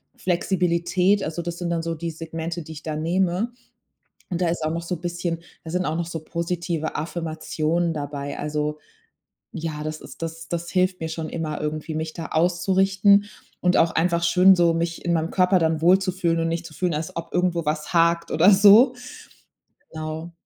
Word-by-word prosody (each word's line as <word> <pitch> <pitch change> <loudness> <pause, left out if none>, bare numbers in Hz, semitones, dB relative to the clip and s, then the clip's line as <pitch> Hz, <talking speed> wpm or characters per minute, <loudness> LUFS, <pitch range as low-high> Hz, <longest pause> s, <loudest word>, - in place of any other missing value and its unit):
Flexibilität. 180 +2 +1
Also, 160 +2 -3
das 170 +1 -5
sind 175 - -2
dann 170 -1 -1
so 165 0 -2
die 165 +1 -4
Segmente, 165 +1 -5
die 160 - -11
ich 155 - -9
da 155 -1 -3
nehme. 180 +7 0 0.8
Und 175 - -2
da 175 - +2
ist 165 -1 -2
auch 155 - 0
noch 170 +1 -3
so 175 +2 -3
'n 165 - -12
bisschen 175 -1 -3 0.2
da 160 - -7
sind 180 0 0
auch 155 +2 -1
noch 170 - -1
so 165 -1 -4
positive 170 -1 -3
Affirmationen 165 +1 -2
dabei. 145 -1 -5
Also 150 0 -2 0.8
ja, 155 -2 -4
das 155 0 -5
ist - - -12
das 165 0 -6
das 170 0 -3
hilft 185 0 +1
mir 160 - -2
schon 160 0 -4
immer 155 -2 -4
irgendwie, 155 +1 -3
mich 160 0 -3
da 165 - -6
auszurichten 190 +4 +3 0.4
und 180 0 +3
auch 165 - +4
einfach 170 0 +1
schön 180 +3 +6
so, 170 -2 +3
mich 165 +1 -3
in 175 - +2
meinem 165 0 0
Körper 185 0 +3
dann 160 -1 +1
wohlzufühlen 185 -2 +3
und 165 - 0
nicht 165 0 -3
zu 155 - -10
fühlen, 175 -2 -1
als 155 +1 -4
ob 165 0 -6
irgendwo 175 -1 +1
was 150 +2 -2
hakt 170 0 +3
oder 165 +5 +5
so. 210 +6 +7 1.0
Genau. 160 +1 -5
170 Hz, 190 wpm, -23 LUFS, 160-180 Hz, 1.0 s, so